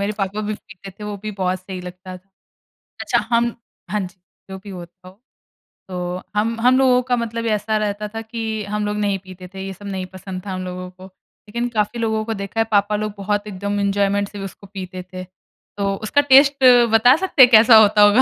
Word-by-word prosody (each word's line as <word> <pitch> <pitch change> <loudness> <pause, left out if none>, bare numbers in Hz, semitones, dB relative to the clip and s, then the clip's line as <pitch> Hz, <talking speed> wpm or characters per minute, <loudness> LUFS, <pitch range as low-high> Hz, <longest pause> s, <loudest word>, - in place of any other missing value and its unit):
मेरे 200 +1 -1
पापा 195 +2 -2
भी 215 0 -3
पीते 200 -2 -13
थे, 205 +3 -11
वो 210 -1 -5
भी 215 - -4
बहुत 185 0 0
सही 185 0 -7
लगता 180 +1 -9
था। 185 +2 -21 0.7
अच्छा, - - +1
हम 235 0 +2 0.4
हाँ 210 +1 0
जी, 185 -1 -8 0.3
जो 190 - -6
भी 200 +1 -11
होता 180 0 -11
हो। 190 +4 -18 0.7
तो 180 -1 -6 0.4
हम 225 +2 0
हम 250 +1 +4
लोगों 255 -2 +4
का 245 - +2
मतलब 230 -1 -3
ऐसा 215 +1 0
रहता 210 0 -2
था 225 +2 -6
कि 225 +1 -7 0.3
हम 210 0 -1
लोग 210 0 -2
नहीं 200 -2 0
पीते 185 -1 -12
थे, 190 - -7
ये 195 - -5
सब 205 +2 -14
नहीं 190 -2 -4
पसंद 185 0 -7
था 195 - -5
हम 185 0 -4
लोगों 180 0 -6
को। 185 +1 -14 0.4
लेकिन 235 +3 -2
काफ़ी 220 +1 -1
लोगों 220 -1 0
को 225 - -2
देखा 200 +3 -5
है, - - +5
पापा 205 0 +2
लोग 215 0 -3
बहुत 205 +1 -2
एकदम 200 +1 -3
एंजॉयमेंट 200 0 0
से 205 - -9
उसको 195 +1 -10
पीते 185 -2 -7
थे। 185 0 -6 0.5
तो 200 -1 0
उसका 285 - +3
टेस्ट 275 0 +5 0.3
बता 235 +3 +6
सकते 365 -7 +3
हैं, 250 -1 +9
कैसा 225 +1 +8
होता 210 -1 +5
होगा? 205 +5 +6
205 Hz, 215 wpm, -20 LUFS, 190-225 Hz, 0.7 s, हैं